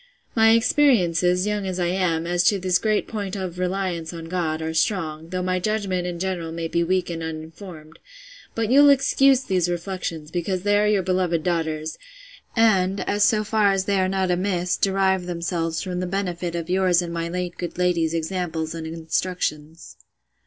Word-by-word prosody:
—My 225 -1 +6
experiences, 185 - +3
young 210 -2 -1
as 185 -1 -3
I 175 - +1
am, 175 -2 0
as 175 0 +1
to 205 - +4
this 185 -1 +1
great 215 -1 0
point 205 -3 -4
of 185 -3 -5
reliance 180 -3 -2
on 165 -1 -8
God, 165 -2 -2
are 160 0 -3
strong, 160 -2 -1
though 180 0 -2
my 185 0 0
judgment 190 -3 -1
in 175 -1 -4
general 175 -2 -3
may 165 0 -3
be 170 +1 0
weak 180 0 0
and 165 -1 -5
uninformed: 160 0 -8 0.6
but 225 0 -1
you'll 285 +2 +7
excuse 275 -1 +4
these 180 -5 0
reflections, 175 -3 -4
because 180 +1 -2
they 205 0 +3
are 210 - +2
your 205 -2 +2
beloved 180 -3 0
daughter's; 160 -2 -2 0.6
and, 195 -4 +2
so 210 +1 +3
far 210 -1 +2
as 195 -1 0
they 200 -1 +1
are 185 0 +1
not 190 -1 0
amiss, 180 -1 0
derive 190 -2 +1
themselves 170 -2 -2
from 180 -2 -4
the 180 - -2
benefit 180 -2 -3
of 170 -1 -3
yours 180 -1 +2
and 170 -1 -5
my 170 0 -3
late 180 0 -3
good 175 -1 -5
lady's 170 -2 +1
examples 165 -1 -3
and 165 -1 -6
instructions. 160 -1 -3
180 Hz, 180 wpm, -23 LUFS, 165-195 Hz, 0.6 s, you'll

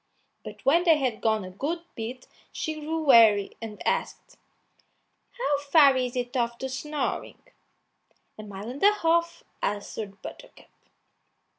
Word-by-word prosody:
But - - -11
when 330 +6 +4
they 330 -3 +5
had 255 -6 -2
gone 220 -2 +1
a 185 - -9
good 315 - -3
bit 240 +3 -6 0.3
she 315 -1 -4
grew 320 +1 -3
weary, 220 -7 +5
and 220 -2 -8
asked, - - -2 1.0
"How 475 -12 +1
far 285 -1 +5
is 250 -1 -1
it 245 0 -3
off 235 -1 0
to 265 - -4
Snoring?" 300 +3 -4 0.9
"A - - -9
mile 205 0 -8
and 275 - -9
a 410 +1 +6
half," 335 -3 0 0.2
answered 205 0 -4
Buttercup. - - -12
260 Hz, 140 wpm, -26 LUFS, 220-315 Hz, 1.0 s, a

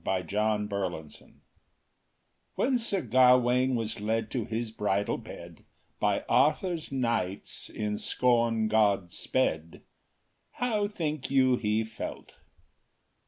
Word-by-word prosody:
THE - - -1
SONG 105 +1 0
OF 105 - -6
COURTESY 90 -6 -4
I - - -22 1.2
WHEN 255 0 +2
Sir 205 -5 -1
Gawain 125 +1 +4
was 110 -2 -3
led 110 +2 -1
to 120 -5 -2
his 115 0 -3
bridal 100 -2 -1
bed, - - -11 0.4
By - - +1
Arthur’s 165 +1 +1
knights 115 -8 -2
in 105 -1 -3
scorn 115 -3 +1
God 100 -5 +2
sped:— 85 -11 -2 0.7
How 220 -5 0
think 155 -8 -3
you 130 -2 +4
he 110 -1 0
felt? 110 0 -7
115 Hz, 120 wpm, -28 LUFS, 105-130 Hz, 1.2 s, Gawain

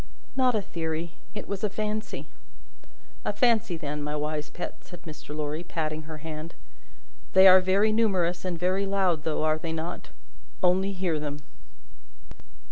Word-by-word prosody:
"Not 255 -2 +3
a 210 - +1
theory; 165 -1 -3 0.2
it - - -5
was 200 0 -4
a 210 - +3
fancy." 215 +1 -3 1.0
"A - - 0
fancy, 225 -8 +2
then, 150 -2 -4
my 150 +1 -2
wise 150 0 -2
pet," 175 - -6
said 175 -2 -12
Mr. 150 -3 -8
Lorry, 150 +2 -2
patting 155 -2 -3
her 155 - -6
hand. 155 +1 -6 0.8
"They 190 +1 +9
are 185 0 +9
very 195 +4 +3
numerous 190 -6 +2
and 180 -2 -2
very 185 +3 +1
loud, 185 -6 +1
though, 155 -1 0
are 155 0 +2
they 160 0 -3
not? 165 +2 -4 0.5
Only 190 +2 +3
hear 180 -4 0
them!" 145 0 -4
175 Hz, 155 wpm, -28 LUFS, 155-195 Hz, 1.0 s, They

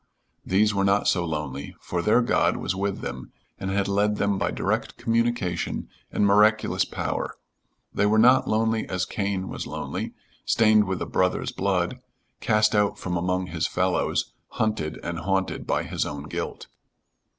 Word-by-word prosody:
these 105 +3 +2
were 100 -1 +1
not 100 +1 +2
so 90 - +2
lonely, 75 -4 -4
for 85 - -3
their 110 +6 +4
God - - +2
was 95 - -2
with 100 +1 -2
them 65 +1 -6 0.3
and 95 - -3
had 100 0 0
led 105 +1 +2
them 100 -1 0
by - - +1
direct - - -2
communication 115 -6 -1 0.2
and 105 - +2
miraculous 105 +2 +4
power; - - -3 0.6
they 105 - +2
were 110 +1 +3
not 125 +4 +6
lonely 110 0 +1
as 90 -1 -1
Cain 100 -1 -2
was - - -5
lonely, - - -4 0.3
stained 110 -2 +4
with 95 -1 -2
a - - -4
brother's 90 0 0
blood, - - -1 0.4
cast 105 0 +3
out 105 -1 +2
from 90 -1 -3
among 90 +2 0
his 80 -2 -2
fellows, 90 +1 0 0.2
hunted 105 -9 -1
and 85 -1 -3
haunted 95 +2 -1
by - - +1
his - - -2
own 70 -1 -5
guilt. 75 - -5
100 Hz, 160 wpm, -25 LUFS, 90-105 Hz, 0.6 s, not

